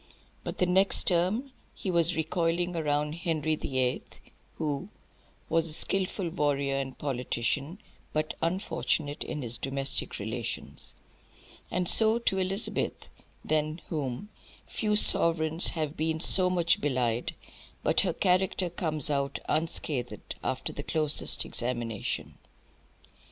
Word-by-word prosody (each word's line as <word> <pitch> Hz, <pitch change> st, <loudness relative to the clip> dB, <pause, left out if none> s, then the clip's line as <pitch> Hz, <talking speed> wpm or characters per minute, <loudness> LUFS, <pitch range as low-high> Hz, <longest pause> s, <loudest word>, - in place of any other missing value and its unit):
But -, -, -5 dB
the 180 Hz, -, +3 dB
next 190 Hz, +2 st, +3 dB
term 195 Hz, +10 st, +2 dB, 0.2 s
he 190 Hz, -, -3 dB
was 170 Hz, 0 st, +3 dB
recoiling 170 Hz, +2 st, 0 dB
round 150 Hz, -2 st, 0 dB
Henry 160 Hz, -2 st, -1 dB
the 135 Hz, -3 st, -4 dB
Eighth, 125 Hz, -1 st, -1 dB, 0.4 s
who 155 Hz, +4 st, -3 dB, 0.6 s
"was 165 Hz, 0 st, +2 dB
a -, -, +2 dB
skilful 190 Hz, +1 st, 0 dB
warrior 140 Hz, -4 st, 0 dB
and 135 Hz, -1 st, -4 dB
politician," 140 Hz, -, -2 dB, 0.3 s
but 155 Hz, 0 st, -1 dB
"unfortunate 165 Hz, -4 st, -1 dB
in 150 Hz, -3 st, -5 dB
his 120 Hz, 0 st, -2 dB
domestic 135 Hz, 0 st, -2 dB
relations;" 110 Hz, +2 st, -5 dB, 0.7 s
and 180 Hz, 0 st, -1 dB
so 220 Hz, +3 st, +4 dB
to 205 Hz, -5 st, 0 dB
Elizabeth, 190 Hz, +3 st, 0 dB, 0.4 s
than 155 Hz, +1 st, 0 dB
whom 145 Hz, +4 st, -4 dB, 0.4 s
"few 210 Hz, -2 st, -1 dB
sovereigns 165 Hz, -4 st, +6 dB
have 155 Hz, -3 st, -2 dB
been 160 Hz, +1 st, -1 dB
so 180 Hz, +2 st, +5 dB
much 170 Hz, -1 st, +2 dB
belied, 125 Hz, -4 st, -1 dB, 0.5 s
but -, -, +4 dB
her 185 Hz, -, +1 dB
character 185 Hz, 0 st, +1 dB
comes 155 Hz, -4 st, -2 dB
out 140 Hz, -1 st, -1 dB
unscathed 155 Hz, -5 st, -2 dB
after 130 Hz, 0 st, -2 dB
the -, -, -5 dB
closest 155 Hz, 0 st, +2 dB
examination." 120 Hz, -3 st, -3 dB
155 Hz, 120 wpm, -28 LUFS, 140-180 Hz, 0.7 s, sovereigns